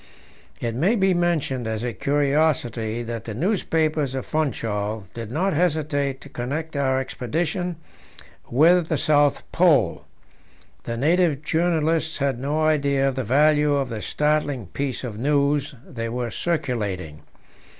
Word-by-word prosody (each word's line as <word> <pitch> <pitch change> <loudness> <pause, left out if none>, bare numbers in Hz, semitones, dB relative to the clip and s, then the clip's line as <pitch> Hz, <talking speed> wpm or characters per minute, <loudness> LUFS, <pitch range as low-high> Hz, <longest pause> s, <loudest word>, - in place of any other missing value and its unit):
It 115 -1 -2
may 170 - +2
be 190 -3 +3
mentioned 160 -8 0
as 110 0 -3
a 120 -1 -2
curiosity 140 -4 0
that 115 -1 -5
the 110 - -5
newspapers 155 - 0
of 130 - -3
Funchal 110 -8 -2
did 115 -2 -6
not 180 +9 0
hesitate 150 -4 0
to - - -10
connect 145 +5 -4
our 130 -2 +1
expedition 165 +7 -2 0.7
with 165 +6 +4
the 160 - 0
South 145 0 +3
Pole. 150 - +3 0.8
The 115 - -3
native 160 +1 +2
journalists 160 -1 +1
had 135 -3 -1
no 145 +4 -1
idea 140 -3 +2
of - - -3
the 130 - -2
value 150 +4 +3
of 135 -3 -1
the 110 -3 -5
startling 150 -5 0
piece 135 +8 -4
of 110 -4 -5
news 145 +1 +1
they 115 -2 -5
were 120 0 -3
circulating. 105 - -2
140 Hz, 140 wpm, -23 LUFS, 120-155 Hz, 0.8 s, with